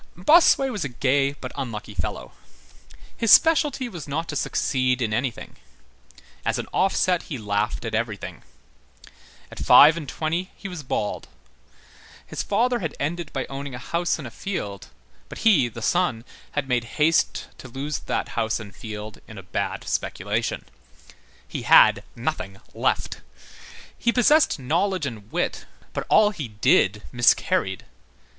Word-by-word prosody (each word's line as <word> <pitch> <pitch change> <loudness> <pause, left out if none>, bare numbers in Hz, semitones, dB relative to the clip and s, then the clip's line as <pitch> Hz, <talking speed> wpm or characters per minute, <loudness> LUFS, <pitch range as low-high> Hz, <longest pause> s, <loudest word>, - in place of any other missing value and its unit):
Bossuet 270 - +5
was 210 - -3
a 140 - -3
gay 135 +3 +1
but 130 -3 -8
unlucky 120 -6 -5
fellow. - - -4 0.8
His 230 -2 +1
specialty 295 -5 +5
was 170 - -8
not 160 +4 -3
to 145 - -4
succeed 130 -2 0
in 110 -4 -1
anything. 120 +1 -3 0.9
As - - 0
an - - -3
offset, 185 -2 +2
he 145 - -3
laughed 105 +1 -2
at 115 - -4
everything. 110 -2 -3 1.1
At - - -10
five 155 +3 +8
and 155 -5 -6
twenty 170 +4 -2
he 200 - -8
was 180 -4 -6
bald. 115 -6 -3 1.0
His - - -4
father 240 +4 +1
had 160 -6 -4
ended 165 +2 -3
by 135 - -3
owning 135 -1 -6
a - - -5
house 170 +7 -1
and 145 -6 -7
a - - -10
field; 105 - -5 0.4
but - - -8
he, 165 - +5
the 115 -1 -8
son, 175 -10 +1 0.3
had 145 -2 -2
made 125 -2 0
haste 155 +2 +2
to - - -10
lose 135 +4 -4
that - - -3
house 110 +1 -1
and 100 -2 -10
field 110 -1 -8
in 110 - -11
a 95 - -8
bad 90 - -3
speculation. 105 +4 -2 0.8
He - - -5
had - - +6
nothing 95 0 -4 0.2
left. - - -1 0.8
He 235 - +2
possessed 285 +6 +4
knowledge 165 +6 0
and 110 -5 -7
wit, - - -2 0.3
but - - -4
all 210 -1 +5
he 155 - -5
did 105 -1 +2
miscarried. 120 0 +2
140 Hz, 150 wpm, -24 LUFS, 115-175 Hz, 1.1 s, five